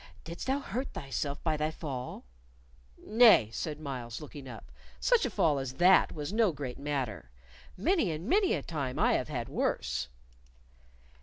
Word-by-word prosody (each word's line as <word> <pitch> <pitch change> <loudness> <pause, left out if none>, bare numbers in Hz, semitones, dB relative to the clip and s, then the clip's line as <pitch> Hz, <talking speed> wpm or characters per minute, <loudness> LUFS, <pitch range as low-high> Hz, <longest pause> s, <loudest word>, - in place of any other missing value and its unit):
"Didst 170 +7 -7
thou 265 +1 +2
hurt 255 +3 -4
thyself 140 0 -4
by 160 -2 +1
thy 155 +1 0
fall?" 135 - -6 0.7
"Nay," 215 - +5
said 150 +3 -4
Myles, 125 -6 -5
looking 145 -3 -9
up, 110 - -11 0.3
"such - - +3
a - - -4
fall 150 -4 +2
as 135 -1 -4
that 180 +6 +5
was 150 +3 -5
no 220 -3 +3
great 135 -5 -6
matter. 135 - -3 0.5
Many 315 - +2
and 160 +4 -4
many 390 - +3
a - - -4
time 140 -6 -3
I - - +3
have 130 - -1
had 120 -5 -3
worse." - - -1
150 Hz, 160 wpm, -30 LUFS, 130-180 Hz, 0.7 s, Nay